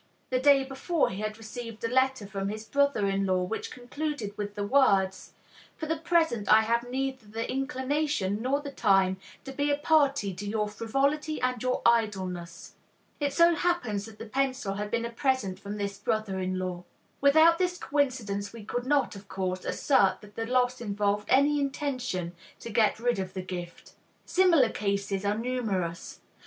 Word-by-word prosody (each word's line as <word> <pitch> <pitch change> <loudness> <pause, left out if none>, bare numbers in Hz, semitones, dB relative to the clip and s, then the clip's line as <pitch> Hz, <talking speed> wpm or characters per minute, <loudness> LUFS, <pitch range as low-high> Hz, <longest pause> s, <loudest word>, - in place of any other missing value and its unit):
The 255 - +2
day 275 0 +5
before 270 +5 0
he 190 +2 -5
had 215 0 -3
received 225 0 -8
a - - +1
letter 260 -2 +1
from 195 -1 -3
his 215 +1 -6
brother 280 -5 +2
in 195 0 0
law, 185 -1 +2
which 200 +5 -4
concluded 250 -4 -5
with 205 0 -5
the 205 - -2
words, 200 -7 +2 0.4
"For 315 - -4
the 320 +1 0
present 320 - +1
I 215 +1 +8
have 235 +2 0
neither 260 -2 -3
the 225 +2 -4
inclination 270 -6 -1
nor 270 +4 0
the 285 -1 -6
time 195 -6 +3 0.3
to 270 - -7
be 285 +2 -1
a 285 - +2
party 285 - +2
to 190 +3 -7
your 210 0 0
frivolity 275 +8 -1
and 250 -2 -1
your 255 0 -1
idleness." 190 -7 0 0.5
It 285 -1 0
so 340 +3 +5
happened 335 -12 0
that 215 +1 -10
the 225 - -7
pencil 260 -3 -1
had 205 +1 -4
been 235 +1 -1
a 235 - -4
present 235 -6 0
from 205 +1 -6
this 200 -1 -4
brother 205 -2 -1
in 185 0 -2
law. 180 -1 -4 0.4
Without 315 +4 +6
this 360 -1 0
coincidence 240 - -1
we 230 -2 -10
could 245 +3 -3
not, 280 -5 +2
of 200 0 -11
course, 185 -1 -3
assert 195 -9 +2
that 210 -1 -14
the 225 0 -3
loss 250 0 +1
involved 205 -1 -1
any 285 +3 +4
intention 255 - -2 0.3
to 230 - -7
get 215 -1 +2
rid 240 -2 +1
of 185 0 -5
the 185 - -3
gift. 175 -1 -8 0.3
Similar 340 -10 +4
cases 200 -2 -2
are 205 +1 +1
numerous. 215 -8 -3
230 Hz, 180 wpm, -28 LUFS, 200-275 Hz, 0.5 s, I